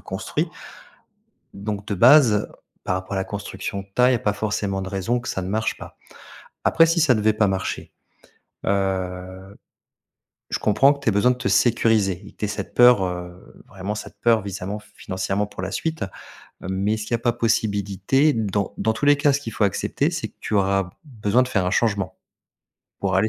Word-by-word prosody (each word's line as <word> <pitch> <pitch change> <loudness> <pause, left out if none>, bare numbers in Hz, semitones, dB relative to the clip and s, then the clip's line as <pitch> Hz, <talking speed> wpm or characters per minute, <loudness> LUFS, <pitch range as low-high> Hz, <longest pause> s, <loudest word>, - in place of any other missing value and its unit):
construit. - - -3 1.1
Donc 100 0 -5
de 100 - -1
base 120 -1 +6 0.4
par 95 - -1
rapport 95 +1 -5
à - - -1
la 95 - 0
construction 100 -1 -5
de 95 - -16
taille, 125 +1 +5
il - - +3
y - - +3
a - - -11
pas 105 -1 0
forcément 100 -2 -2
de 95 - -6
raison 105 +5 -1
que 120 - -9
ça 95 - -2
ne 90 - -5
marche 110 +2 -1
pas. - - -11 0.7
Après, 165 - +5
si 165 +1 +1
ça 150 -5 +5
ne - - 0
devait 110 +1 +3
pas 105 -1 +2
marcher. 95 0 -3 0.8
Heu, 95 0 -2 0.9
je - - -1
comprends 135 +7 +4
que 140 - -7
tu 135 - -1
aies 110 - +4
besoin 105 +5 +3
de 125 - +1
te 125 - -6
sécuriser 105 -2 +2
et - - -12
que - - -35
tu - - -2
aies - - -6
cette 105 -2 -5
peur, 120 -5 +6
heu, 90 +1 -7
vraiment 100 +1 -5
cette 105 - -8
peur, 115 -3 +3
visamment 100 +1 -5 0.2
financièrement 95 +2 -2
pour 95 - -8
la 95 - -3
suite. 160 +6 -2 0.6
Mais 95 +3 -1
est-ce 110 - -4
qu'il 120 - -2
y - - +5
a - - -9
pas 120 0 +1
possibilité 110 +4 +1
dans 100 -5 -1
dans 110 - +1
tous 115 - -3
les 145 0 +6
cas, 145 0 +3
ce 140 - 0
qu'il 115 -5 -7
faut 105 - +1
accepter, 100 - 0
c'est - - -3
que - - -29
tu 110 - -4
auras 95 -2 +1
besoin 120 -3 +1
de 125 - -2
faire 95 -7 0
un - - +1
changement. 100 -4 0 0.8
Pour 95 -1 0
aller 110 +3 +3
105 Hz, 210 wpm, -23 LUFS, 95-115 Hz, 1.1 s, base